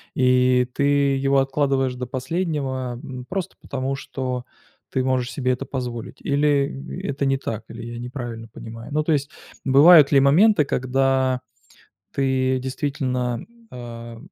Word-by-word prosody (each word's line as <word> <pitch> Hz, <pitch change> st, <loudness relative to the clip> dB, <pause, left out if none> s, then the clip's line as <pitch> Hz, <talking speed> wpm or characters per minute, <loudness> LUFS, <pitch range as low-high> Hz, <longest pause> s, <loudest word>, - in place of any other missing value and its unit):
И 125 Hz, -1 st, +3 dB
ты 140 Hz, -, -1 dB, 0.3 s
его 135 Hz, +1 st, +2 dB
откладываешь 135 Hz, -1 st, +1 dB
до 125 Hz, 0 st, -5 dB
последнего, 130 Hz, -3 st, -2 dB
м, 130 Hz, -3 st, -7 dB
просто 190 Hz, -2 st, -3 dB
потому, 135 Hz, 0 st, -3 dB
что 130 Hz, -2 st, -4 dB, 0.5 s
ты 130 Hz, -, 0 dB
можешь 130 Hz, -1 st, 0 dB
себе 130 Hz, -3 st, 0 dB
это 125 Hz, -, -2 dB
позволить, 125 Hz, -4 st, -5 dB
или 140 Hz, -1 st, 0 dB
это 140 Hz, 0 st, -1 dB
не 135 Hz, 0 st, +2 dB
так, 115 Hz, -5 st, -5 dB
или 115 Hz, +1 st, -8 dB
я 120 Hz, 0 st, -7 dB
неправильно 120 Hz, -2 st, -6 dB
понимаю? 115 Hz, +3 st, -10 dB
Ну, 155 Hz, +1 st, +1 dB
то 160 Hz, -, 0 dB
есть, 145 Hz, -2 st, +1 dB, 0.4 s
бывают 145 Hz, +2 st, +8 dB
ли 140 Hz, -, +6 dB
моменты, 155 Hz, +5 st, +5 dB
когда 130 Hz, 0 st, +1 dB, 0.7 s
ты 130 Hz, -1 st, +1 dB
действительно, 130 Hz, -2 st, -2 dB, 0.3 s
а, 115 Hz, -1 st, -8 dB
130 Hz, 140 wpm, -23 LUFS, 125-140 Hz, 0.7 s, бывают